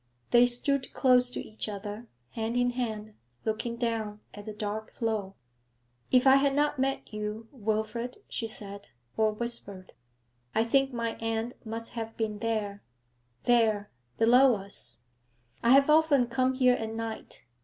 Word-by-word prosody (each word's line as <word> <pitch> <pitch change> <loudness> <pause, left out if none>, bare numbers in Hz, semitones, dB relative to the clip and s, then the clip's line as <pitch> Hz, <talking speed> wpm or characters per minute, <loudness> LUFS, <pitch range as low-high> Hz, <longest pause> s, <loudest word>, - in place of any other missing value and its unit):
They 240 0 +7
stood 260 +2 0
close 250 -2 +4
to 250 - -3
each 215 0 -5
other, 205 +3 -6 0.2
hand 225 +1 -2
in 245 0 +2
hand, 220 -4 -4 0.3
looking 225 +2 -1
down 225 -3 -2
at 205 +1 -10
the - - -3
dark 210 +1 -4
flow. 215 -4 -2 0.7
'If 255 0 +4
I 265 0 +8
had 275 0 +2
not 295 -1 +1
met 270 -3 -1
you, 210 +1 -4
Wilfrid,' 220 0 -2
she 225 - -3
said, 200 -2 -7 0.3
or 220 -1 +3
whispered, 210 -4 -6 0.6
'I 220 - +4
think 270 +3 +2
my 230 -2 -3
end 225 +1 -2
must 225 0 -6
have 225 -1 -6
been 215 -2 -2
there 210 -3 -2 0.6
there, 220 -4 +2 0.3
below 245 +2 +6
us. 195 - -7 0.6
I 235 - +2
have 275 +2 +7
often 300 -4 +5
come 255 +2 +1
here 255 -1 +5
at 225 -2 -3
night. 225 0 -6
230 Hz, 150 wpm, -29 LUFS, 215-245 Hz, 0.7 s, I